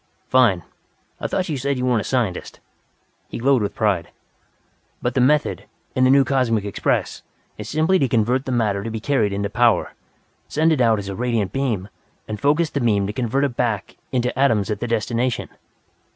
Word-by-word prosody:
"Fine! 115 -9 +4 0.6
I - - -2
thought 185 - -1
you 150 -5 -2
said 140 +1 -1
you 125 - -1
weren't 120 -3 +2
a - - -5
scientist." 115 -8 -2 0.7
He - - -5
glowed 130 0 +3
with 100 - -3
pride. 100 -6 0 0.9
"But 120 - -2
the 130 - +2
method, 150 +4 +2 0.3
in 130 - +3
the - - +4
new 135 +1 +6
Cosmic 120 -6 +1
Express, 100 - -1 0.4
is - - -6
simply 160 +5 +2
to 135 - +2
convert 125 +3 +1
the 130 - -3
matter 105 -5 0
to 115 - -4
be 110 0 -4
carried 115 -4 +1
into 100 +1 -1
power, 120 +2 +2 0.5
send 160 +2 +2
it 140 - 0
out 115 -2 +4
as 100 -1 -5
a 100 - -4
radiant 115 -4 -1
beam 120 -9 -1 0.4
and 105 -1 -5
focus 150 +3 +2
the 140 - -2
beam 105 -4 +2
to 105 - -4
convert 130 +4 0
it 135 -4 -1
back 110 -6 -2 0.2
into 125 -2 0
atoms 110 -7 +2
at 105 - -2
the 120 - -3
destination." 115 +2 -1
120 Hz, 195 wpm, -21 LUFS, 105-135 Hz, 0.9 s, new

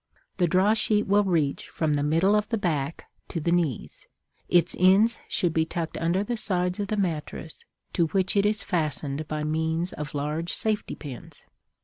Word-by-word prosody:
The 175 - +3
draw 190 +5 +4
sheet 215 -2 +1
will 205 +1 +4
reach 165 -7 0
from 155 -2 0
the 145 - +1
middle 165 +7 +3
of 210 0 0
the 230 - 0
back 160 -6 -2 0.2
to 165 - -3
the 170 +2 0
knees; 170 -8 -1 0.4
its 175 -1 +3
ends 195 +6 +5
should 175 -3 0
be 160 - +3
tucked 165 0 -4
under 170 +4 0
the 235 +3 -3
sides 180 -2 0
of 205 - -1
the 215 - -2
mattress, 160 -3 -3 0.3
to 170 -2 +2
which 190 +4 0
it 200 0 +4
is 210 0 +1
fastened 150 -2 -1
by 150 0 -3
means 160 +3 -1
of 150 0 -6
large 150 +4 -2
safety 215 -1 -1
pins. 135 -6 -9
170 Hz, 180 wpm, -26 LUFS, 155-200 Hz, 0.4 s, ends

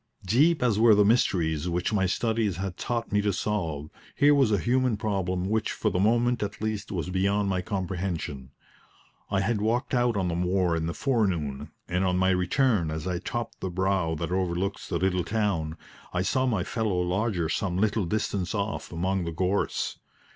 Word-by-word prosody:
Deep 145 - +3
as 110 -4 +2
were 115 -1 +7
the 105 0 +5
mysteries 90 -8 +2
which 85 +4 -1
my 95 -3 +2
studies 110 -2 0
had 95 -1 -4
taught 115 +3 -3
me 105 0 +3
to 105 0 +1
solve, 85 -7 -2 0.2
here 145 +3 +5
was 135 -6 +3
a 105 - +3
human 125 +2 +1
problem 95 -4 -1
which 110 +1 0
for - - -1
the 90 - 0
moment 120 +4 +2
at 105 0 -4
least 110 -1 -3
was 90 -2 -3
beyond 100 +2 +1
my 95 -1 0
comprehension. 90 - -3 0.8
I 95 -1 +1
had 105 +1 0
walked 115 +3 0
out 120 -3 +2
on 95 -2 0
the 85 - -1
moor 90 0 +1
in 80 0 -1
the 85 - -3
forenoon, 95 - -1 0.2
and 90 +2 0
on 90 -1 +1
my 95 +1 +3
return, 90 - +2
as 80 0 -4
I 90 -2 -1
topped 115 +4 -4
the 95 - -3
brow 95 -2 0
that 75 - -4
overlooks 95 +1 -1
the - - 0
little 90 0 +1
town, 95 -7 -1 0.4
I 90 - 0
saw 130 +7 +1
my 105 -8 +1
fellow 105 -3 -1
lodger 90 0 0
some 90 +2 -1
little 105 0 +1
distance 100 0 -1
off 100 +1 -3
among 95 +2 -1
the 85 - -3
gorse. 90 +4 -1
95 Hz, 190 wpm, -27 LUFS, 90-110 Hz, 0.8 s, were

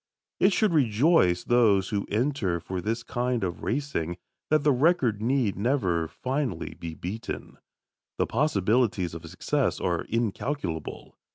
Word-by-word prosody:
It 195 - +5
should 205 -1 +2
rejoice 120 - +3
those 105 -6 +3
who 100 -2 -2
enter 110 -6 0
for 90 +2 -5
this 115 +4 -2
kind 120 -2 -1
of 90 -2 -3
racing 115 - -2 0.3
that 155 -1 +3
the 150 - +4
record 130 - +2
need 120 -3 +1
never 95 - 0
finally 130 - -3
be 85 -1 -7
beaten. 105 +8 -6 0.6
The - - +2
possibilities 110 - +1
of 85 0 -8
success 135 - -1
are 85 -2 -1
incalculable. 115 - -3
115 Hz, 130 wpm, -27 LUFS, 90-135 Hz, 0.6 s, It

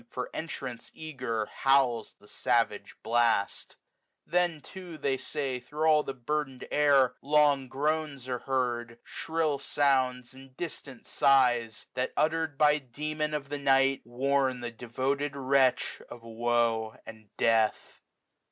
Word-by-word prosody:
For 125 0 -5
entrance 135 -7 -6
eager, 125 -8 -3
howls 130 -3 +1
the 105 - -19
savage 115 -3 0
blast. 115 -3 +1 0.5
190 175 0 +1
Then - - -14
too, 180 +1 -10
they 140 -2 0
say, 135 -3 -3
thro' 150 +5 -2
all 150 -1 +5
the 135 - -6
burtfaen'd 135 0 -3
air. 140 -4 +4
Long 145 -2 +3
groans 145 -1 -2
are 125 -1 -2
heard, 120 -3 -2
shrill 160 -3 -2
sounds, 130 -3 +1
and 135 0 -15
distant 140 -7 -6
sigh;. 125 -5 +3 0.2
That, 130 - -2
utter'd 160 -1 0
by 150 0 +4
the 135 - -24
Demon 150 +4 -3
of 140 -2 -5
the 145 0 -3
night. 135 -1 +3
WINTER. 135 +3 +1
tSs - - -10
Wnm - - -10 0.2
thie 120 - -8
dcwtod 135 +4 -1
wretch 135 -1 +2
of 120 -1 -11
woe 115 -1 0
and 110 -2 -12
death. 115 -1 +1
135 Hz, 145 wpm, -29 LUFS, 120-150 Hz, 0.5 s, all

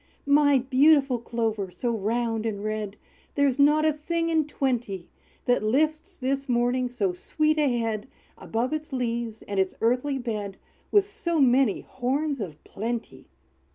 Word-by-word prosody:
"My 285 0 +5
beautiful 270 0 +4
Clover, 225 -4 -2
so 235 +6 -2
round 225 +1 -1
and 205 -2 -4
red, 215 -1 -3 0.4
There 285 - +3
is 270 0 -1
not 300 +2 +5
a 310 - +3
thing 330 +3 -2
in 320 -2 +2
twenty, 240 - -2 0.3
That 245 - +3
lifts 310 - 0
this 275 +1 -2
morning 245 +1 +1
so 205 -7 -1
sweet 310 - 0
a 270 -5 +2
head 225 -2 -2 0.3
Above 240 +6 -2
its 310 0 -4
leaves, 235 -3 -3
and 200 -1 -3
its 190 -1 0
earthy 250 +4 +1
bed, 210 -6 -4 0.3
With 405 -1 +4
so 340 -5 -2
many 260 -4 +4
horns 275 +3 -2
of 160 -8 -6
plenty!" 230 +3 -5
250 Hz, 155 wpm, -26 LUFS, 225-290 Hz, 0.4 s, My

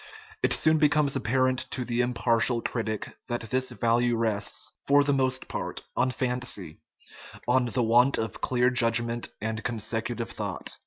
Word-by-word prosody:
It - - +2
soon 155 0 +3
becomes 150 -2 +3
ap 135 - -3
parent 130 +1 +1
to 125 - -3
the 120 +1 0
impartial 120 -1 +1
critic 110 -3 -3
that 120 -1 -2
this 130 0 +1
value 120 +1 +1
rests, 110 -3 0
for 145 +1 +5
the 145 0 +2
most 130 -1 0
part, - - -5
on 130 +1 +2
fancy, 125 - -4 0.7
on 125 +1 +3
the 120 +1 0
want 120 +4 +4
of 110 - -4
clear 125 0 +2
judgment 115 -1 +1
and 110 +1 -3
consecutive 115 0 -3
thought. - - -4
120 Hz, 155 wpm, -27 LUFS, 115-130 Hz, 0.7 s, for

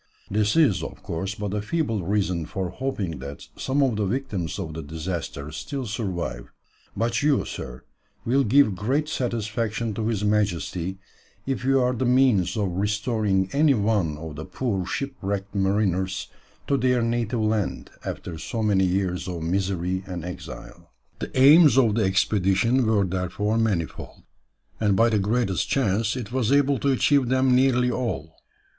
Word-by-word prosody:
This 105 0 +1
is, 150 - +4
of - - -8
course, 95 +5 -3
but 105 -3 -4
a 105 - -1
feeble 115 - -1
reason 90 -3 -1
for 95 -2 -3
hoping 100 - -3
that 70 +2 -8
some 140 +2 0
of 125 -6 +1
the 105 - 0
victims 100 -8 -3
of 80 - -5
the 80 - -5
disaster 80 -1 -5
still 130 - -5
survive; 95 - -4 0.5
but 115 +1 0
you, 145 -2 +2
sir, 65 -1 -7 0.4
will 135 +4 +3
give 120 -3 +4
great 135 +11 0
satisfaction 115 -3 -2
to 110 +1 -2
his 110 -3 -1
Majesty, 95 -3 0 0.5
if 135 -2 -2
you 135 +1 +3
are 125 0 +2
the 130 +1 -1
means 125 -8 +3
of 100 -3 0
restoring 105 0 0
any 145 -1 +4
one 100 -8 0
of 80 -1 -8
the 75 - -5
poor 100 -8 -2
shipwrecked 100 -8 -3
mariners 95 -1 0 0.4
to 140 - +1
their 125 -2 +2
native 115 0 -1
land 110 -2 -1
after 85 -3 -6
so 110 +6 -3
many 100 -3 +3
years 90 0 -1
of 85 -3 -4
misery 95 +1 -1
and 90 -2 -5
exile." 85 -8 -9 0.3
The - - -4
aims 145 +1 +7
of 115 -5 +4
the 110 -1 +2
expedition 95 +5 +2
were 105 -3 +3
therefore 95 +4 -1
manifold, 100 -8 -2 0.6
and 105 -3 +2
by 115 +4 +4
the 110 -2 +2
greatest 105 -1 0
chance 110 -3 +1
it 120 -4 -5
was 125 -2 0
able 140 -2 +3
to 140 - +1
achieve 135 0 +3
them 130 0 +3
nearly 125 -1 +3
all. 110 -11 -3
105 Hz, 160 wpm, -24 LUFS, 95-125 Hz, 0.6 s, aims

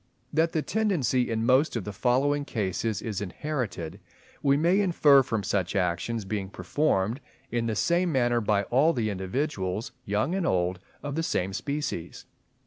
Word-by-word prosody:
That 165 +2 +2
the 155 - 0
tendency 175 - +1
in 115 0 -1
most 130 +4 +3
of 115 - -2
the 105 - -6
following 135 +7 +1
cases 105 -3 -2
is 105 -4 -3
inherited, 105 - -4 0.4
we 140 -1 +3
may 175 +6 +3
infer 155 -8 +5
from 110 -5 -2
such 95 0 -1
actions 95 +4 -1
being 95 -1 -3
performed 105 - 0 0.3
in 115 -1 0
the 110 - -1
same 170 - +2
manner 120 -3 +2
by 105 -1 +2
all 140 - +3
the 110 -5 -1
individuals, 95 0 -2
young 110 - 0
and 190 -2 0
old, 90 0 +1 0.2
of 145 -1 -3
the 160 - -1
same 95 - -1
species. 120 - -4
120 Hz, 160 wpm, -27 LUFS, 100-145 Hz, 0.4 s, infer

